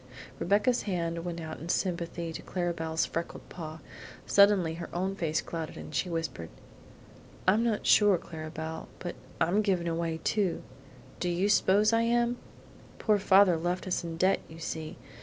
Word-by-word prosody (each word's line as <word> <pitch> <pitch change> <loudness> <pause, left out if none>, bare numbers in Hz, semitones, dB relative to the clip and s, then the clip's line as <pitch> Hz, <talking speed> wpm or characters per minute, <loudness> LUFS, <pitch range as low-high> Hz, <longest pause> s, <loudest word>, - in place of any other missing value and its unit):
Rebecca's 205 +6 +2
hand 170 -2 -2
went 170 -1 -4
out 160 -1 -6
sympathetically 170 -2 -1
to - - -6
Clara 175 -2 -2
Belle's 160 -1 -1
freckled 170 +1 -5
paw. 160 -2 -7 0.4
Suddenly 200 -5 +5
her - - -6
own 190 +2 -1
face 160 -4 0
clouded 165 -2 -5
and - - -9
she 140 +6 0
whispered: 165 - -3 1.0
"I'm 210 +5 +5
not 225 -3 0
sure, 205 -3 +6
Clara 155 -2 -8
Belle, 160 0 -6
but 175 -1 -5 0.3
I'm 175 +6 +3
given 190 -5 +1
away 165 -1 -1
too 200 -5 0 0.6
do 180 - 0
you 175 +3 +1
s'pose 210 +1 +4
I 230 - +4
am? 240 +1 +2 0.6
Poor 210 -2 +2
father 190 -3 +5
left 175 +2 -2
us 185 - -1
in 165 -1 -5
debt, 185 +3 +3
you 160 - -11
see. 160 -1 -5
175 Hz, 160 wpm, -29 LUFS, 165-200 Hz, 1.0 s, sure